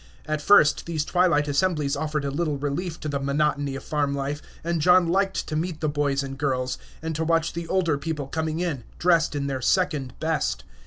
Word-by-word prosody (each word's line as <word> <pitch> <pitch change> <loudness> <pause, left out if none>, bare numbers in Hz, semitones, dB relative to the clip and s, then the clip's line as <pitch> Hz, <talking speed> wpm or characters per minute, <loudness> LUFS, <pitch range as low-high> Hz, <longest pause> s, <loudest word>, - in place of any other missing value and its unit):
At 155 -1 -2
first 150 -3 +5
these 155 -3 -1
twilight 175 -5 +2
assemblies 150 -1 +1
offered 150 -2 -2
a 140 - -1
little 150 0 -1
relief 150 +4 -3
to - - -4
the 140 -1 -1
monotony 140 0 0
of 135 - -7
farm 145 -2 0
life; 140 +2 -3 0.2
and 170 -1 -1
John 180 +1 +5
liked 190 +2 +1
to 155 - -4
meet 160 0 -2
the 155 - 0
boys 145 -2 0
and 135 0 -7
girls, 130 -3 -1 0.2
and 160 -1 -3
to 160 - -1
watch 165 0 +1
the 170 0 -5
older 170 -6 +1
people 150 -1 -3
coming 160 +3 -2
in, 155 -9 -2
dressed 170 -3 +3
in 140 -1 -1
their 135 -2 -2
second 150 -5 +1
best. 160 -1 -1
150 Hz, 205 wpm, -25 LUFS, 140-165 Hz, 0.2 s, first